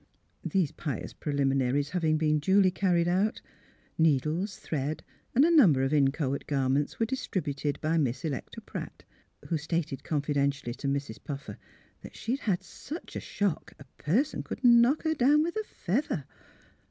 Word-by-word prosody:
These 185 -7 +1
pious 145 -5 -5
preliminaries 140 -1 0
having 160 -3 +1
been 155 -1 +2
duly 190 +4 +4
car 185 -1 +1
ried 170 0 +2
out, 190 +5 +1 0.6
needles, 160 +6 +1
thread, 150 0 -3 0.3
and 270 +5 +6
a 335 0 +4
number 165 - +6
of 135 +2 0
in 140 -2 +4
choate 140 -2 -3
garments 140 0 0
were 225 - +3
distributed 150 - -2
by 160 +1 +1
Miss 135 0 -1
Electa 140 -5 -4
Pratt, - - -8 0.5
who 165 - 0
stated 155 -3 -2
confidentially 140 -4 -1
to 135 +2 -5
Mrs. 140 -6 -3
Puffer 140 -1 -7 0.4
that - - -11
she 240 - -2
'd - - -8
had 195 -9 -1
such 320 +4 -9
a - - -2
shock 200 -5 -2
a - - -12 0.2
person 225 - +1
could - - -7
knock 240 +4 +5
her 315 -1 +1
down 295 +2 +4
with 340 +1 -3
a 435 - -1
feather. 200 - -2
155 Hz, 165 wpm, -29 LUFS, 140-200 Hz, 0.6 s, and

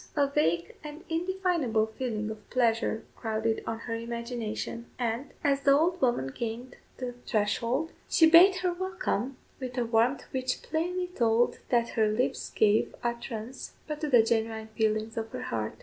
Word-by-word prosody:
A 290 -2 +4
vague 170 - 0
and 300 +2 -8
indefinable 335 -9 +1
feeling 220 -1 -3
of 215 -1 -11
pleasure 230 -2 +1
crowded 220 -1 -1
on 225 0 -3
her 230 - -4
imagination; 235 0 -4
and, 240 +3 -2
as 280 -1 +2
the 275 0 +5
old 350 +4 +1
woman 240 - +1
gained 240 +2 -5 0.2
the 250 -1 -4
threshold, 235 +8 0 0.2
she 325 - +6
bade 350 +4 +8
her 360 - +2
"welcome" 345 - -2 0.2
with 255 -1 -6
a 245 - +1
warmth 230 +4 +2
which 260 -1 -2
plainly 355 +3 -1
told 240 -8 +1
that 235 -1 +2
her 220 -1 +2
lips 215 +4 -1
gave 215 0 +2
utterance 235 0 -4
but 300 0 -5
to 305 - -1
the 240 -4 +6
genuine 220 -1 -1
feelings 220 0 -1
of 225 0 -2
her - - -4
heart. 110 -1 -3
235 Hz, 160 wpm, -29 LUFS, 220-285 Hz, 0.2 s, bade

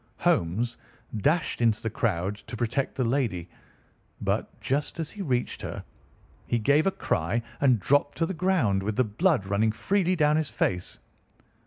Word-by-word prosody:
Holmes 115 - +1 0.4
dashed 150 - +1
into 115 -2 +3
the 115 - -2
crowd 100 -3 0
to 110 +3 -9
protect 120 +4 -1
the 130 - 0
lady; 115 - 0 0.7
but, - - -2
just 145 +5 -2
as 160 -1 -3
he 210 - -7
reached 125 -8 -1
her, - - -5 0.6
he 120 - +1
gave 145 - +3
a - - +3
cry 95 - -1 0.2
and 130 -5 +4
dropped 145 +8 +2
to 165 - +2
the 190 - -3
ground, 165 - +2
with 105 +2 -2
the 130 - +3
blood 125 - +1
running 100 +3 +2
freely 185 - +1
down 150 -2 +3
his 155 -2 0
face. 90 0 -1
120 Hz, 165 wpm, -27 LUFS, 105-155 Hz, 0.7 s, and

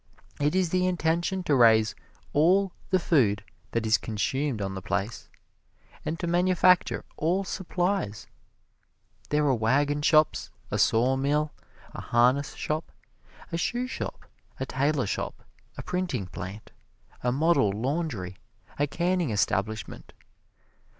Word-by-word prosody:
It 145 +3 +1
is 185 -3 +1
the 185 0 +2
intention 175 +2 0
to 150 - +1
raise 110 -4 +5 0.4
all 185 +6 +4 0.2
the 185 - +4
food 115 - +2 0.3
that 115 -1 -1
is 110 +1 +3
consumed 130 +4 -1
on 95 -1 -3
the 95 - -5
place, 100 +4 -3 0.7
and 165 - -3
to - - -2
manufacture 180 +1 +3
all 175 +5 +1
supplies. 180 - -2 1.0
There 150 0 +2
are 140 - +3
wagon 140 +6 +1
shops, 155 0 +3 0.2
a - - -1
sawmill, 135 +6 +2 0.4
a - - -6
harness 125 +4 +2
shop, 155 +1 -3 0.6
a 165 - -1
shoe 240 +8 -1
shop, 255 - -6 0.3
a 130 - -1
tailor 140 0 0
shop, - - -4 0.3
a - - -6
printing 180 - -2
plant, 95 +3 -8 0.5
a 125 - +1
model 145 -6 +3
laundry, 115 - -3 0.4
a 145 - +2
canning 175 +1 0
establishment. 105 0 -2
145 Hz, 125 wpm, -27 LUFS, 110-175 Hz, 1.0 s, raise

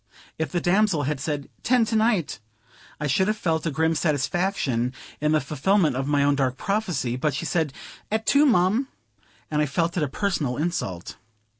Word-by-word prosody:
If 160 - -2
the 175 - 0
damsel 180 -3 +2
had 145 +1 -2
said, 145 0 -3
"ten 245 -1 +3
to 225 - -2
night," 215 - +1 0.6
I 150 - -2
should 150 +7 +2
have 215 0 0
felt 165 -4 -1
a - - +2
grim 160 +2 +1
satisfaction, 145 -5 0 0.3
in 150 +1 +1
the 155 - +4
fulfillment 150 +3 +1
of 135 +1 -2
my 145 -1 +2
own 145 0 +3
dark 135 -2 0
prophecy; 180 - -1
but 135 +2 -1
she 165 - -3
said, 160 -4 0 0.4
"At 220 +1 0
two, 290 +1 +5
mum;" 220 +3 +3 0.6
and 150 0 +1
I 150 - +1
felt 170 +4 -1
it - - +1
a 150 - +1
personal 150 -5 -1
insult. 145 - -3
160 Hz, 185 wpm, -24 LUFS, 140-195 Hz, 0.6 s, two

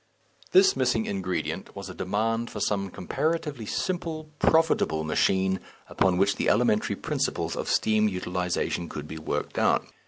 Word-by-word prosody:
This 190 +1 +6
missing 125 -4 +1
ingredient 95 -2 -3
was 100 -1 -6
a 95 - -7
demand 115 +5 -1
for 105 - -6
some 100 -1 0
comparatively 150 - -2
simple, 160 - -3
profitable 160 - +3
machine, 95 +4 +1 0.3
upon 95 -2 +2
which 100 +1 +2
the - - +1
elementary 110 -1 +2
principles - - -2
of - - -3
steam 110 0 +3
utilization 90 -2 -2
could 75 0 -6
be 80 +1 -7
worked 80 - -3
out. - - +3
100 Hz, 145 wpm, -27 LUFS, 90-125 Hz, 0.3 s, This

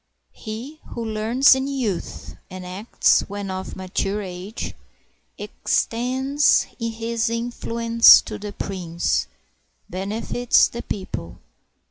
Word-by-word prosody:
He 240 +8 -8
who 235 - -5
learns 225 +5 +4
in 265 +1 -1
youth, 250 -10 -4
and 185 0 -8
acts 190 +5 +2
when 200 -1 -5
of 185 0 -5
mature 195 +2 -2
age. 185 +3 -6 0.6
Extends 265 +5 +1 0.2
his 230 0 -2
influence 230 0 +5
to - - -7
the 205 0 -6
prince, 170 - -2 0.6
benefits 215 +6 +2
the 235 - -6
people. 90 - -6
220 Hz, 100 wpm, -22 LUFS, 190-235 Hz, 0.6 s, influence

